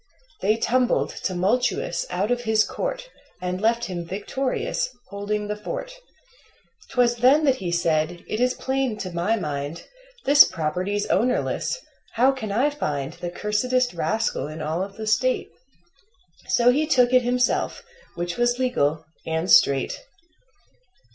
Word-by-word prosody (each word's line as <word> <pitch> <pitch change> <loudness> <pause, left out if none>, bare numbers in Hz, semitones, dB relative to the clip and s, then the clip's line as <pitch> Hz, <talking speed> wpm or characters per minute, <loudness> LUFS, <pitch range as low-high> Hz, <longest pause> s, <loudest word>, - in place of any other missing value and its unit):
They 215 +3 +2
tumbled, 250 +1 +1
tumultuous, 245 - 0
out 205 +5 -1
of 245 0 +1
his 220 -2 +3
court - - -4 0.3
And 180 +1 -3
left 230 +2 +2
him 180 -4 -4
victorious, 245 +6 -2 0.2
holding 205 +1 -3
the 210 - -2
fort. - - -6 1.0
'Twas 240 -1 +2
then 270 +6 +5
that 265 -2 +3
he 180 -5 -4
said: 170 0 0
"It 215 - -3
is 250 +1 +2
plain 265 -4 -1
to 190 -3 -5
my 175 +6 0
mind 150 -4 -4 0.4
This 285 +1 +9
property's 185 +6 -2
ownerless 245 - 0 0.4
how 255 +4 +4
can 250 -6 -5
I 255 +8 +2
find 145 - -3
The 175 - -6
cursedest 245 +6 0
rascal 215 +3 -1
in 155 +1 -8
all 155 +3 -2
of 195 +1 -6
the 220 - -5
State?" 255 +4 +1 1.0
So 240 +1 +4
he 300 +4 +1
took 250 -4 +3
it 255 - +6
himself, 245 0 0 0.3
which 175 0 -3
was 240 0 +2
legal 160 - 0 0.2
and 160 +2 -1
straight. 135 +2 +4
215 Hz, 140 wpm, -24 LUFS, 175-250 Hz, 1.0 s, This